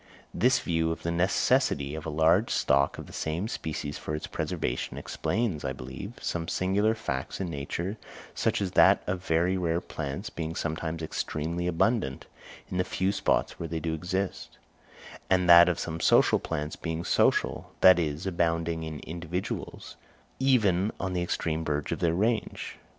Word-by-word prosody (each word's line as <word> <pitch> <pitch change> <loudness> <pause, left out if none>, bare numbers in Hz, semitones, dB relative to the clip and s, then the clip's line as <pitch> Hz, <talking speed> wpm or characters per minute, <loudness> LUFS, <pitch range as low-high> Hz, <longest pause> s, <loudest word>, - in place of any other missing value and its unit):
This 125 +3 +3
view 80 -1 0
of 80 - -5
the 85 - -1
necessity 90 - +2
of 80 0 -5
a - - -1
large 80 +8 +3
stock - - +2
of - - -7
the - - -13
same 80 +6 -2
species 75 -7 -4
for 75 - -4
its 75 - -4
preservation, - - -3
explains, 105 -7 -2
I - - -2
believe, 65 0 -8
some 85 -1 -3
singular 100 +5 +1
facts 70 -12 -4
in 90 -3 -3
nature 85 +8 -4 0.4
such - - 0
as 95 - -2
that - - +5
of 90 0 -3
very 85 +2 +2
rare 85 -2 0
plants 80 +4 -5
being 80 0 -4
sometimes 80 0 -3
extremely 80 +2 -2
abundant, 90 - 0 0.5
in 90 - -2
the - - +3
few 95 +1 0
spots - - 0
where 85 - -4
they 80 0 -2
do 80 0 -2
exist; 90 +4 -3 0.7
and 90 -1 +3
that 85 0 +9
of 85 - 0
some 80 0 -4
social - - +4
plants 75 +1 -4
being 80 0 -4
social, - - +1
that 95 -2 +8
is 80 +1 -2
abounding 85 -2 0
in 80 -1 -6
individuals, 85 +2 -5 0.4
even 110 -7 +3
on 95 -1 -2
the 90 - 0
extreme 80 -2 -1
verge 75 -1 -2
of - - -2
their 85 -1 +1
range. 110 +5 -1
85 Hz, 165 wpm, -28 LUFS, 80-95 Hz, 0.7 s, that